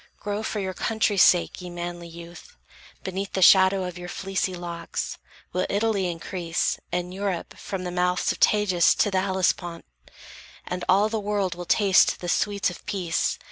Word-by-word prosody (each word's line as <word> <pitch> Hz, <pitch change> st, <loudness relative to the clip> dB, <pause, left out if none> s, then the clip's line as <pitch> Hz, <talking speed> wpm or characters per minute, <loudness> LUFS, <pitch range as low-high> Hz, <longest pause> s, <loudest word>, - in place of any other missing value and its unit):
Grow 205 Hz, +1 st, -3 dB
for 220 Hz, -1 st, -3 dB
your 190 Hz, -1 st, -3 dB
country's 220 Hz, -2 st, +1 dB
sake, 175 Hz, +1 st, +4 dB
ye 180 Hz, -, -7 dB
manly 175 Hz, 0 st, -6 dB
youth! 170 Hz, -, -12 dB, 0.5 s
Beneath 190 Hz, +1 st, -4 dB
the 190 Hz, -, -1 dB
shadow 190 Hz, +1 st, +6 dB
of 180 Hz, -1 st, -6 dB
your 175 Hz, 0 st, -7 dB
fleecy 190 Hz, -1 st, -2 dB
locks, 170 Hz, -1 st, -5 dB, 0.3 s
Will 180 Hz, -, 0 dB
Italy 200 Hz, -3 st, +1 dB
increase, 170 Hz, 0 st, -2 dB
and 180 Hz, +1 st, -2 dB
Europe 195 Hz, -3 st, -3 dB
from 190 Hz, -2 st, -5 dB
The 180 Hz, -, -4 dB
mouths 180 Hz, 0 st, +1 dB
of -, -, -6 dB
Tagus 200 Hz, -5 st, +4 dB
to 205 Hz, -, +2 dB
the 190 Hz, -1 st, +2 dB
Hellespont, 185 Hz, -3 st, -1 dB, 0.8 s
And 180 Hz, 0 st, -4 dB
all 200 Hz, +3 st, +5 dB
the 220 Hz, 0 st, -2 dB
world 200 Hz, -3 st, -1 dB
will 175 Hz, +1 st, -7 dB
taste 195 Hz, 0 st, +4 dB
the 175 Hz, -, -5 dB
sweets 200 Hz, 0 st, +1 dB
of 175 Hz, -, -12 dB
peace. 180 Hz, -4 st, -1 dB
185 Hz, 170 wpm, -25 LUFS, 175-200 Hz, 0.8 s, shadow